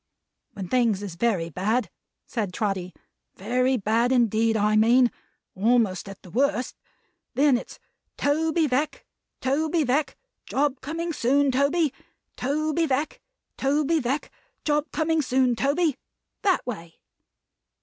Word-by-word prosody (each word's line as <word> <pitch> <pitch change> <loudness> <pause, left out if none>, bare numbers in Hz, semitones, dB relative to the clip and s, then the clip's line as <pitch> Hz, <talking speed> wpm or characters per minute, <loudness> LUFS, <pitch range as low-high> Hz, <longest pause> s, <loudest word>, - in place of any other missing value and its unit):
"When 195 -3 -6
things 230 -3 +1
is 195 -4 -5
very 175 -4 0
bad," 215 - 0 0.3
said 215 -6 -3
Trotty; 190 -4 -2 0.4
"very 250 +6 +1
bad 230 +3 +1
indeed, 225 -2 +3
I 210 0 +2
mean; 235 +3 +5 0.4
almost 205 -2 +1
at 195 - -11
the 180 - -13
worst; 255 0 0 0.6
then 285 -1 +4
it's 240 - -5 0.4
'Toby 320 +3 +1
Veck, 295 +3 -1 0.4
Toby 310 +5 +1
Veck, 280 +3 0 0.3
job 275 -1 0
coming 330 +4 -3
soon, 275 +2 +2
Toby! 280 +3 +2 0.4
Toby 310 +4 0
Veck, 280 +3 -1 0.4
Toby 295 +4 +1
Veck, 270 +2 -2 0.3
job 295 -1 0
coming 320 0 +1
soon, 255 -2 +2
Toby!' 285 +4 +1 0.4
That 385 -3 +2
way." 170 -9 -6
255 Hz, 120 wpm, -25 LUFS, 220-295 Hz, 0.6 s, mean